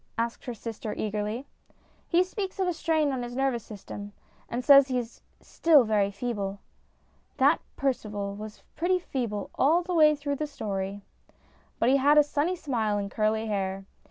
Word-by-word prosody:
asked 230 0 -2
her 245 - -4
sister 220 -1 -6
eagerly. 215 +4 -3 0.3
" - - -36
He 345 +2 +4
speaks 385 +1 -5
of 375 - +1
a 355 - +1
strain 315 -3 +1
on 260 -2 -2
his 240 0 -6
nervous 265 -4 0
system, 205 -1 -9 0.4
and 245 +1 -3
says 280 -1 +8
he 255 -2 -1
is 240 -1 -5 0.2
still 310 -5 +4
very 210 -3 +2
feeble." 200 -2 -3 0.8
That - - +4
Percival 210 -7 -2
was 215 +1 -9
pretty 360 +3 +2
feeble 235 - -4
all 325 +6 +3
the 360 +1 -4
way 305 -2 +6
through 285 -1 -3
the 305 - -2
story. 200 -7 -4 0.7
But 235 - +2
he 275 - +5
had 290 +2 +4
a 300 - +8
sunny 295 +5 0
smile 235 -11 -1
and 200 -1 -3
curly 220 +1 0
hair. 195 -2 -2
245 Hz, 175 wpm, -27 LUFS, 210-295 Hz, 0.8 s, says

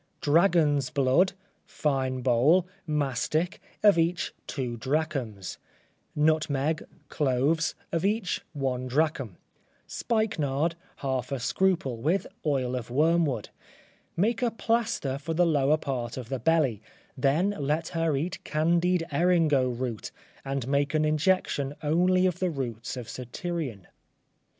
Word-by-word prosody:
Dragon's 150 -3 +3
blood, 140 +8 +3 0.3
fine 130 -3 -1
bole, 135 +9 +4 0.2
mastic, 150 +3 -1 0.2
of 205 -5 +6
each 170 +2 0
two 125 -4 -3
drachms; 130 - -2 0.6
nutmeg, 155 0 +1 0.3
cloves, 145 +3 +1 0.2
of 165 - -1
each 205 -2 0
one 130 -3 -2
drachm; 135 - 0 0.5
spikenard, 170 - 0 0.3
half 130 -1 -1
a 135 - -1
scruple, 160 -2 +1
with 160 +11 0 0.2
oil 130 -3 0
of 125 -2 -5
wormwood; 150 -3 +2 0.7
make 225 +7 +1
a 245 - +3
plaster 225 - -1
for 160 +3 -4
the 175 +2 +4
lower 150 -2 +3
part 125 -6 -4
of 125 -3 -6
the 135 -1 -2
belly, 135 -6 +2 0.3
then 145 +9 +2
let 150 +3 -1
her 165 -3 0
eat 165 +6 -3
candied 170 +3 +2
eringo 165 -7 +3
root, 120 -2 -4 0.3
and 135 -2 -3
make 140 +2 +1
an 155 0 +3
injection 150 -3 +1
only 180 +4 +3
of 180 -3 0
the 185 - +1
roots 125 -5 -4
of 125 - -5
satyrion. 130 - -5
150 Hz, 120 wpm, -27 LUFS, 130-170 Hz, 0.7 s, of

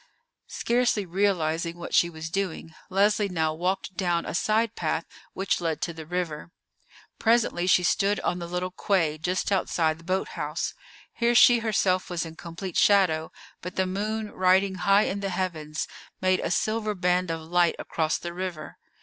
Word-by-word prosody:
Scarcely 235 -4 +1
realizing 170 -3 0
what 175 - -7
she 170 - +4
was 160 -1 -7
doing, 180 -4 -3 0.2
Leslie 205 +2 +2
now 160 -3 0
walked 185 +3 -2
down 175 -3 0
a - - -4
side 220 +5 +1
path 160 0 -1 0.3
which 190 -1 -1
led 160 -3 -1
to 170 - -2
the 160 -1 -9
river. 175 -3 -3 0.7
Presently 225 -6 +2
she 180 -1 +5
stood 200 +3 +2
on 180 - -1
the 170 - -5
little 180 +1 -3
quay 165 -5 0
just 180 +5 -1
outside 165 -4 +1
the - - -15
boat 185 +3 -1
house. 150 +2 -3 0.4
Here 235 0 +1
she 240 +1 +7
herself 195 -5 +1
was 175 -2 -2
in 160 - -8
complete 170 +2 -6
shadow, 180 -6 +3 0.3
but 180 +1 -7
the 190 - +1
moon 210 +3 -3
riding 190 +1 +3
high 200 +2 +3
in 200 - -2
the 200 0 -2
heavens 165 -5 -3 0.3
made 185 0 +2
a - - -2
silver 215 +3 0
band 180 -1 +1
of 165 0 -3
light 175 +1 +2
across 160 -1 -1
the 170 0 -6
river. 180 -4 -6
180 Hz, 170 wpm, -26 LUFS, 165-195 Hz, 0.7 s, she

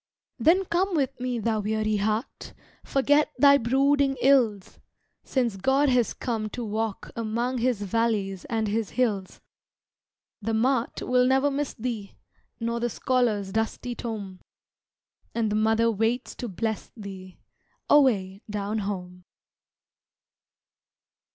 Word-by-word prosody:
Then 370 +4 +4
come 360 +2 0
with 270 -5 -1
me, 250 -1 -2
thou 225 -1 0
weary 215 0 0
heart! 215 +3 -3 0.3
Forget 290 +2 +2
thy 280 -1 +6
brooding 275 +3 +2
ills, 240 -8 +2 0.4
Since 240 -7 -1
God 270 +7 +2
has 250 -3 +2
come 225 -4 -3
to 240 - -3
walk 215 -1 -3
among 235 +3 -1
His 235 -4 0
valleys 200 -2 -1
and 225 -2 -1
his 215 0 -1
hills! 205 -7 -1 1.0
The 220 +2 -1
mart 245 +1 0
will 250 0 +3
never 265 +2 +3
miss 285 0 -2
thee, 220 -4 -5 0.4
Nor 235 0 -2
the 240 +1 0
scholar's 225 -6 0
dusty 225 +3 -2
tome, 205 -6 -6 1.0
And 225 -2 0
the - - 0
Mother 225 +2 +3
waits 225 +4 -1
to 245 - -4
bless 220 +2 -3
thee, 190 -3 -9 0.5
Away 205 -9 +3
down 210 +1 -2
home. 180 -3 -5
230 Hz, 125 wpm, -26 LUFS, 210-255 Hz, 1.0 s, thy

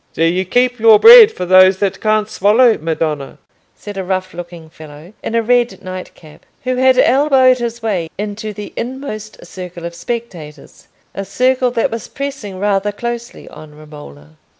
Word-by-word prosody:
"Do 165 - 0
you 180 +3 0
keep 245 +4 0
your 220 -1 +6
bread 460 -1 +9
for 180 - -6
those 185 +1 +5
that 195 -1 -2
can't 215 -1 +1
swallow, 220 +3 +3
madonna?" 155 -3 -4 0.4
said 205 -1 -10
a 190 - -3
rough 185 0 -3
looking 170 -1 -10
fellow, 155 +3 -14
in 230 - -5
a 230 - +1
red 240 -3 0
night 185 0 -8
cap, 155 -2 -18 0.2
who 255 0 -2
had 260 0 +3
elbowed 260 -1 +3
his 235 -1 -5
way 185 -7 -2
into 210 +1 -5
the 210 0 -9
inmost 230 -6 -7
circle 180 -1 -9
of 170 - -6
spectators—a 170 - -9
circle 255 +5 0
that 240 -2 -1
was 230 -1 -6
pressing 275 -9 -7
rather 205 +1 -1
closely 235 +2 -7
on 150 -1 -14
Romola. 80 - -14
205 Hz, 165 wpm, -16 LUFS, 175-240 Hz, 0.4 s, bread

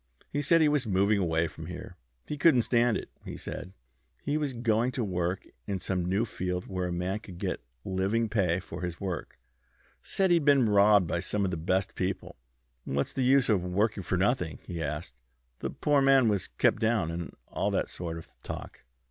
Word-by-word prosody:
He 145 - 0
said 165 +3 +4
he 155 - +6
was 145 -5 +1
moving 100 +1 +3
away 80 -2 +1
from - - -9
here. - - -8 0.3
He 150 - -4
couldn't 140 -5 +5
stand 120 -1 +3
it, - - -8
he - - -7
said. 90 - -6 0.5
He 145 - 0
was 150 -2 0
going 115 +1 +1
to 125 - -1
work 90 -2 -1 0.2
in 100 - -1
some 90 -1 -2
new 100 +5 +2
field 90 -4 -3
where 90 -2 -2
a - - -3
man 90 +4 -2
could 95 -5 -11
get - - -3 0.2
living 100 +5 +1
pay 95 -5 +1
for 95 - -8
his 90 -1 -4
work. 90 -6 -4 0.6
Said 190 -2 +1
he'd 170 -3 +4
been 140 -4 +5
robbed 100 -1 +5
by 85 - -1
some 100 +3 -1
of 95 - -1
our - - +1
best 95 +3 0
people; 95 +1 -3 0.5
what's 70 +1 -1
the 135 - -1
use 130 +1 +4
of 100 -6 +2
working 100 +3 0
for 90 0 -1
nothing? 95 - +1
he 85 -2 -5
asked. 75 -4 -5 0.4
The - - -3
poor 145 -2 +2
man 135 -3 +5
was 100 -4 +1
kept - - +2
down, 110 -7 +1
and 85 0 -5
all - - -1
that - - 0
sort 85 -2 -5
of 80 - -11
talk." - - -8
100 Hz, 200 wpm, -29 LUFS, 90-120 Hz, 0.6 s, he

